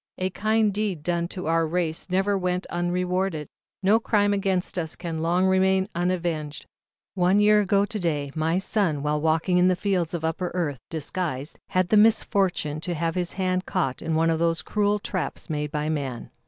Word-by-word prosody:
A 185 Hz, 0 st, -1 dB
kind 215 Hz, +1 st, +1 dB
deed 200 Hz, -7 st, -2 dB
done 170 Hz, 0 st, 0 dB
to 185 Hz, +1 st, -7 dB
our 165 Hz, 0 st, +2 dB
race 165 Hz, +1 st, -2 dB
never 190 Hz, +2 st, +1 dB
yet 195 Hz, -, -1 dB
went 180 Hz, +1 st, -1 dB
unrewarded. 180 Hz, -2 st, -1 dB, 0.4 s
No 210 Hz, +4 st, +5 dB
crime 205 Hz, -3 st, +2 dB
against 190 Hz, -2 st, 0 dB
us 160 Hz, -1 st, -3 dB
can 165 Hz, -2 st, -4 dB
long 175 Hz, +3 st, +2 dB
remain 190 Hz, +1 st, +3 dB
unavenged. 170 Hz, -4 st, -2 dB, 0.5 s
One 185 Hz, +1 st, +3 dB
year 210 Hz, 0 st, +5 dB
ago 200 Hz, 0 st, +2 dB
to 215 Hz, 0 st, -5 dB
day, 150 Hz, -6 st, -1 dB
my 160 Hz, +2 st, 0 dB
son, 185 Hz, -7 st, 0 dB
while 150 Hz, 0 st, 0 dB
walking 160 Hz, +3 st, +2 dB
in 180 Hz, -, +5 dB
the 185 Hz, -, +3 dB
fields 180 Hz, -3 st, -1 dB
of 160 Hz, -1 st, -3 dB
Upper 170 Hz, +2 st, -1 dB
Earth, 150 Hz, -7 st, -1 dB
disguised, 155 Hz, -3 st, -4 dB
had 185 Hz, -2 st, +1 dB
the 215 Hz, -, +4 dB
misfortune 195 Hz, -8 st, +2 dB
to 175 Hz, 0 st, -3 dB
have 165 Hz, +1 st, -1 dB
his 180 Hz, -2 st, -1 dB
hand 185 Hz, -1 st, -1 dB
caught 130 Hz, -1 st, -1 dB
in 160 Hz, -, -1 dB
one 165 Hz, +1 st, +3 dB
of 160 Hz, -, 0 dB
those 165 Hz, -1 st, +1 dB
cruel 210 Hz, 0 st, +1 dB
traps 185 Hz, -5 st, -4 dB
made 150 Hz, -1 st, -2 dB
by 150 Hz, 0 st, -2 dB
man. 140 Hz, -6 st, -3 dB
180 Hz, 190 wpm, -25 LUFS, 160-190 Hz, 0.5 s, No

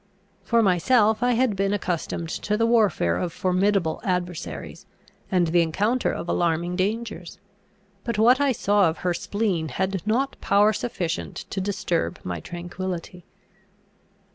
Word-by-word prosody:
For 230 Hz, +4 st, +2 dB
myself, 210 Hz, +4 st, +3 dB
I 245 Hz, 0 st, +3 dB
had 240 Hz, -3 st, +2 dB
been 195 Hz, +1 st, 0 dB
accustomed 175 Hz, -3 st, -2 dB
to 210 Hz, +5 st, -2 dB
the 230 Hz, -, +2 dB
warfare 205 Hz, -, +2 dB
of 170 Hz, -, -2 dB
formidable 185 Hz, -1 st, +1 dB
adversaries, 175 Hz, -, -4 dB, 0.4 s
and 180 Hz, -2 st, +3 dB
the 170 Hz, +1 st, +4 dB
encounter 205 Hz, +10 st, +1 dB
of -, -, -5 dB
alarming 170 Hz, +1 st, 0 dB
dangers; 200 Hz, -2 st, -3 dB, 0.7 s
and 235 Hz, -2 st, -1 dB
what 245 Hz, +5 st, +5 dB
I 280 Hz, -1 st, +3 dB
saw 205 Hz, -5 st, +3 dB
of 160 Hz, -, -5 dB
her 180 Hz, -, +2 dB
spleen 195 Hz, -4 st, -1 dB
had 190 Hz, +6 st, -2 dB
not 260 Hz, +5 st, 0 dB
power 205 Hz, +2 st, +4 dB
sufficient 200 Hz, -7 st, -3 dB, 0.2 s
to 195 Hz, -, -2 dB
disturb 185 Hz, -3 st, -1 dB
my 90 Hz, -2 st, -4 dB
tranquillity. 175 Hz, -, -6 dB
190 Hz, 140 wpm, -24 LUFS, 175-215 Hz, 0.7 s, what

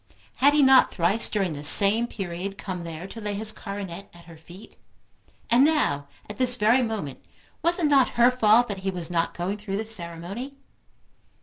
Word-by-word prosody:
Had 285 Hz, +2 st, +3 dB
he 295 Hz, -, +4 dB
not 265 Hz, -1 st, +5 dB
thrice 195 Hz, +5 st, +1 dB
during 195 Hz, -6 st, -2 dB
the 145 Hz, -, -8 dB
same 205 Hz, +9 st, +6 dB
period 195 Hz, -2 st, -7 dB
come 185 Hz, -4 st, -7 dB
there 165 Hz, +1 st, -8 dB
to 225 Hz, +4 st, -10 dB
lay 210 Hz, -1 st, -4 dB
his 215 Hz, +1 st, -1 dB
coronet 200 Hz, -2 st, -8 dB
at 170 Hz, -, -17 dB
her 165 Hz, -1 st, -14 dB
feet; 175 Hz, +5 st, -16 dB, 0.7 s
and 240 Hz, +3 st, +3 dB
now, 260 Hz, -, 0 dB, 0.2 s
at 210 Hz, -, -10 dB
this 250 Hz, -1 st, +3 dB
very 240 Hz, +2 st, +2 dB
moment, 220 Hz, -, -5 dB, 0.4 s
was 340 Hz, +1 st, +1 dB
it 345 Hz, -, -1 dB
not 280 Hz, -3 st, +3 dB
her 240 Hz, +1 st, +5 dB
fault 240 Hz, -1 st, +3 dB
that 200 Hz, -3 st, -6 dB
he 190 Hz, +1 st, -4 dB
was 175 Hz, -2 st, -4 dB
not 170 Hz, -1 st, -2 dB
going 190 Hz, +4 st, -4 dB
through 200 Hz, -2 st, -5 dB
the 220 Hz, -, -4 dB
ceremony? 195 Hz, +6 st, -8 dB
205 Hz, 190 wpm, -24 LUFS, 175-240 Hz, 0.7 s, same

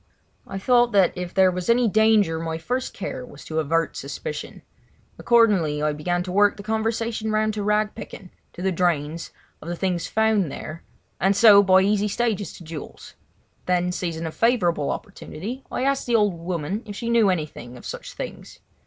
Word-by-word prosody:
I 195 Hz, -, -5 dB
thought 240 Hz, +3 st, +3 dB
that 195 Hz, -3 st, +4 dB
if 180 Hz, -1 st, -5 dB
there 190 Hz, -1 st, +4 dB
was 180 Hz, +1 st, -4 dB
any 240 Hz, 0 st, +4 dB
danger 215 Hz, -6 st, +3 dB
my 160 Hz, 0 st, -3 dB
first 250 Hz, +10 st, -3 dB
care 260 Hz, -1 st, -5 dB
was 245 Hz, -, -12 dB
to 160 Hz, 0 st, -2 dB
avert 165 Hz, +2 st, 0 dB
suspicion. 475 Hz, -2 st, -6 dB, 0.6 s
Accordingly 195 Hz, -11 st, +3 dB
I 150 Hz, 0 st, +1 dB
began 175 Hz, +4 st, -1 dB
to 180 Hz, -, -6 dB
work 205 Hz, +2 st, +3 dB
the 200 Hz, -, -8 dB
conversation 220 Hz, +1 st, -1 dB
round 215 Hz, 0 st, +1 dB
to 210 Hz, -, -3 dB
rag 210 Hz, +1 st, +1 dB
picking—to 185 Hz, -4 st, -11 dB
the 190 Hz, -, +1 dB
drains—of 165 Hz, -2 st, -3 dB
the 175 Hz, -, -2 dB
things 180 Hz, -1 st, -1 dB
found 220 Hz, -7 st, +1 dB
there; 155 Hz, +2 st, -7 dB, 0.4 s
and 195 Hz, +2 st, +2 dB
so 205 Hz, -1 st, +8 dB
by 190 Hz, -1 st, +5 dB
easy 205 Hz, +1 st, +2 dB
stages 210 Hz, -2 st, -1 dB
to -, -, -12 dB
jewels. 160 Hz, -2 st, -9 dB, 0.5 s
Then, 180 Hz, 0 st, +1 dB
seizing 170 Hz, -2 st, -3 dB
a 160 Hz, -, -3 dB
favourable 175 Hz, -, +1 dB
opportunity, 230 Hz, -, -6 dB
I -, -, -2 dB
asked 275 Hz, -1 st, 0 dB
the 240 Hz, -, +2 dB
old 210 Hz, -3 st, +3 dB
woman 170 Hz, +3 st, -3 dB
if 205 Hz, -, -7 dB
she 230 Hz, -, -5 dB
knew 230 Hz, -4 st, +4 dB
anything 150 Hz, -8 st, -4 dB
of -, -, -13 dB
such -, -, -7 dB
things. -, -, -8 dB
195 Hz, 180 wpm, -23 LUFS, 170-220 Hz, 0.6 s, so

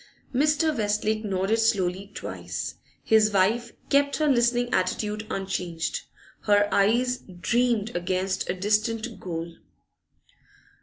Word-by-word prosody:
Mr. 300 Hz, +3 st, +2 dB
Westlake 215 Hz, 0 st, 0 dB
nodded 195 Hz, +2 st, 0 dB
slowly 195 Hz, -3 st, +1 dB
twice. -, -, -5 dB, 0.3 s
His 215 Hz, -1 st, +4 dB
wife 220 Hz, +5 st, +2 dB, 0.2 s
kept 280 Hz, 0 st, +3 dB
her 310 Hz, -, +1 dB
listening 245 Hz, -2 st, +2 dB
attitude 210 Hz, +3 st, -1 dB
unchanged; 180 Hz, -4 st, -3 dB, 0.4 s
her 205 Hz, -1 st, +4 dB
eyes 240 Hz, +5 st, +2 dB
'dreamed 230 Hz, +4 st, 0 dB
against 185 Hz, +2 st, -1 dB
a 180 Hz, -, 0 dB
distant 215 Hz, +4 st, 0 dB
goal. 170 Hz, -1 st, -5 dB
215 Hz, 105 wpm, -26 LUFS, 190-240 Hz, 0.4 s, His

